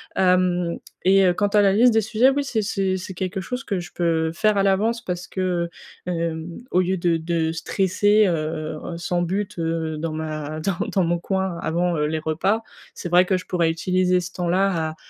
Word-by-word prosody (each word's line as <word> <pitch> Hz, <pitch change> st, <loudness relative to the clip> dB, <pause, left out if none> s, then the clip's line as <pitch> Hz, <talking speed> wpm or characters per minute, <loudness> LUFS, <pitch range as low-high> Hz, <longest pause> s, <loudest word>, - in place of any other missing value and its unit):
Hem 180 Hz, -2 st, +2 dB, 0.3 s
et 195 Hz, 0 st, +5 dB
heu, 180 Hz, -, +4 dB
quant 205 Hz, +3 st, +1 dB
à 205 Hz, 0 st, +3 dB
la 195 Hz, -1 st, +4 dB
liste 240 Hz, +4 st, +5 dB
des 225 Hz, -, +4 dB
sujets, 220 Hz, +4 st, +3 dB
oui, 280 Hz, +1 st, 0 dB
c'est 230 Hz, -5 st, -1 dB
c'est 195 Hz, -2 st, -1 dB
c'est 185 Hz, 0 st, -7 dB
quelque 185 Hz, +1 st, -3 dB
chose 250 Hz, +6 st, -5 dB
que 200 Hz, -8 st, -2 dB
je 175 Hz, -, -8 dB
peux 165 Hz, -2 st, 0 dB
faire 215 Hz, +4 st, +1 dB
à 195 Hz, -, +3 dB
l'avance 215 Hz, +4 st, +1 dB
parce 180 Hz, -3 st, -4 dB
que, -, -, -7 dB, 0.7 s
heu 180 Hz, -, 0 dB
hem, 165 Hz, 0 st, -3 dB
au 180 Hz, -, +4 dB
lieu 185 Hz, +1 st, 0 dB
de 170 Hz, -1 st, +1 dB
de 160 Hz, 0 st, -1 dB
stresser, 200 Hz, +5 st, +2 dB
heu 155 Hz, -2 st, -2 dB
heu, 170 Hz, -, -5 dB
sans 175 Hz, +1 st, -1 dB
but, 195 Hz, +3 st, -3 dB
heu, 165 Hz, -1 st, -2 dB
dans 160 Hz, +1 st, -3 dB
ma 155 Hz, -1 st, -4 dB
dans 175 Hz, +3 st, -1 dB, 0.2 s
dans 190 Hz, -, +3 dB
mon 170 Hz, 0 st, +1 dB
coin, 190 Hz, 0 st, -2 dB
avant, 170 Hz, +1 st, 0 dB
heu, 150 Hz, -, +1 dB
les 155 Hz, +1 st, -1 dB
repas, 170 Hz, +8 st, 0 dB, 0.3 s
c'est 175 Hz, -, -6 dB
vrai 180 Hz, +2 st, +5 dB
que 185 Hz, 0 st, +1 dB
je -, -, -8 dB
pourrais 170 Hz, -3 st, +1 dB
utiliser 180 Hz, +2 st, +1 dB
ce 175 Hz, -, -7 dB
temps-là 175 Hz, -2 st, 0 dB
à -, -, -12 dB
180 Hz, 215 wpm, -23 LUFS, 165-195 Hz, 0.7 s, et